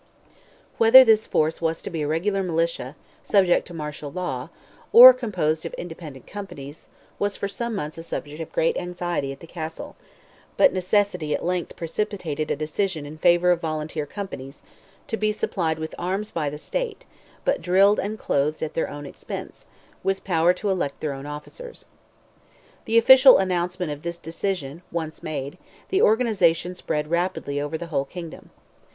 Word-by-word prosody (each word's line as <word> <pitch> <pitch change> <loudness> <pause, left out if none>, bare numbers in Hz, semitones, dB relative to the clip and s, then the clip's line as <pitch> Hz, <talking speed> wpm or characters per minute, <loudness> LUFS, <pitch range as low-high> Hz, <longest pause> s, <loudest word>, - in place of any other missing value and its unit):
Whether 255 +3 +9
this 220 -2 +4
force 155 +2 0
was 165 0 0
to - - -5
be 165 -2 -3
a 150 - -1
regular 190 +6 0
militia, 165 -6 -1 0.3
subject 190 -3 +3
to 175 - -10
martial 150 -2 -6
law, 165 -7 -4 0.4
or 255 +2 +12
composed 180 -11 -1
of - - -6
independent 160 -6 -9
companies, 155 -8 -9 0.3
was 205 0 -1
for 200 - -2
some 235 +3 -4
months 155 -4 -5
a - - -7
subject 150 -1 -5
of 160 - -7
great 165 - +1
anxiety 175 -5 -3
at 135 - -10
the - - -9
castle; 160 -1 -7 0.6
but 280 - +5
necessity 185 -4 +1
at - - -5
length 180 -1 -2
precipitated 165 -4 -3
a - - +1
decision 155 +2 -2
in 155 +2 -10
favour 175 +1 +4
of 175 -1 +1
volunteer 155 -1 -3
companies, 140 -8 -8 0.4
to 225 - -2
be 215 -1 +1
supplied 170 -6 -1
with 160 0 -6
arms 195 +4 -2
by 155 -3 -1
the 150 - -7
state, - - -4 0.4
but - - +1
drilled 195 +3 +4
and 210 +2 -3
clothed 150 -4 -1
at 155 - -4
their 165 - -1
own 145 0 -8
expense, 140 - -8 0.3
with 195 0 -1
power 170 -2 +3
to 195 +2 -2
elect 175 -7 -2
their 150 -2 -2
own 135 +1 -8
officers. 470 - -9 1.0
The 225 - +2
official 260 +3 +8
announcement 180 -2 -1
of 145 0 -6
this 170 +1 -5
decision 165 -3 -4
once 160 -2 -4
made, 145 +2 -5 0.3
the 385 - +2
organization 190 -7 +3
spread 150 -4 -3
rapidly 170 -5 -1
over 145 +2 -3
the 170 - -6
whole 140 -1 +1
kingdom. 170 +2 -9
170 Hz, 170 wpm, -24 LUFS, 155-195 Hz, 1.0 s, or